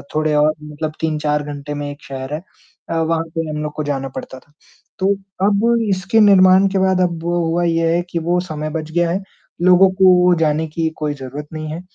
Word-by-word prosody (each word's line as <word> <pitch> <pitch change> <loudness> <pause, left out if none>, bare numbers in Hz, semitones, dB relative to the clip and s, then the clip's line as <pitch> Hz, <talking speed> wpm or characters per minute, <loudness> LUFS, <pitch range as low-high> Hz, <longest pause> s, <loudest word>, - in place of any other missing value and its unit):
थोड़े 155 0 +1
और 150 +1 +3
मतलब 150 +1 -5
3-4 150 -2 0
घंटे 145 0 -6
में 145 0 -4
एक 145 +1 -10
शहर 135 +1 -6
है 155 - -3 0.5
अ, - - -2
वहाँ 165 0 0
पे 165 -1 -2
हम 150 0 -4
लोग 150 -1 -4
को 155 - -3
जाना 135 -2 -3
पड़ता 130 - -7
था। 145 - -29 0.5
तो 195 +1 +2 0.3
अब 200 -1 +2 0.3
इसके 190 +3 +1
निर्माण 190 -2 +6
के 195 - -1
बाद 190 -1 +2
अब 170 -2 -1
हुआ 170 0 0
ये 165 -1 +1
है 175 - +1
कि 170 - -2
वो 175 +2 0
समय 155 0 -4
बच 155 0 -5
गया 175 +1 +1
है, 190 +3 -1 0.4
लोगों 185 +1 +6
को 180 -1 +6
जाने 160 0 +1
की 160 +1 -2
कोई 150 -1 -2
ज़रूरत 140 +2 -8
नहीं 155 -1 -5
है। 165 +3 -5
160 Hz, 210 wpm, -18 LUFS, 150-175 Hz, 0.5 s, निर्माण